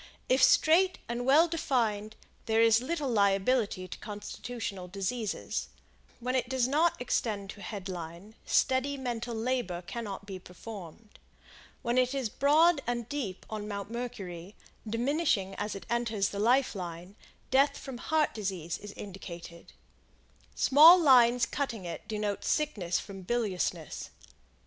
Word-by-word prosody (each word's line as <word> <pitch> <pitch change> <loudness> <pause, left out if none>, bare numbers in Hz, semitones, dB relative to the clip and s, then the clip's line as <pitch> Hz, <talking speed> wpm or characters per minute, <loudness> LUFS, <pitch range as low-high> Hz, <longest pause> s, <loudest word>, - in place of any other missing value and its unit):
If 255 +1 +4
straight 360 +7 +5
and 240 +1 -3
well 310 +5 +6
defined, 230 -10 -1 0.3
there 225 0 +2
is 225 0 +5
little 300 +2 -2
liability 200 -2 +2
to - - -8
constitutional 210 -2 -6
diseases; 195 - -3 0.5
when 250 +2 -2
it 255 -1 0
does 260 -2 +1
not 315 +5 +2
extend 210 -5 -1
to 205 - -13
Head 200 -3 -6
Line, 175 +3 -7
steady 265 +2 +1
mental 240 -2 -3
labor 220 -7 -2
cannot 200 -1 -6
be 195 -2 -7
performed; 200 +2 -11 0.6
when 240 +1 +2
it 255 +2 +1
is 260 -5 -1
broad 300 +5 +4
and 240 -2 -2
deep 235 -11 -4
on 215 -1 -5
Mount 200 0 -5
Mercury, 195 -6 -6 0.3
diminishing 235 - 0
as 205 0 -3
it 195 -3 -8
enters 230 -4 0
the 200 - -5
Life 250 +5 +3
Line, 180 0 -7 0.4
death 275 +2 +4
from 265 -3 -8
heart 315 +2 +1
disease 185 -6 -4
is 205 -1 -9
indicated; 170 -4 -9 0.8
small 320 +6 +8
lines 250 -5 +6
cutting 235 -9 -3
it 170 - -7
denote 210 -2 -2
sickness 210 - 0
from 195 -2 -9
biliousness. 185 -6 -2
225 Hz, 135 wpm, -30 LUFS, 195-260 Hz, 0.8 s, small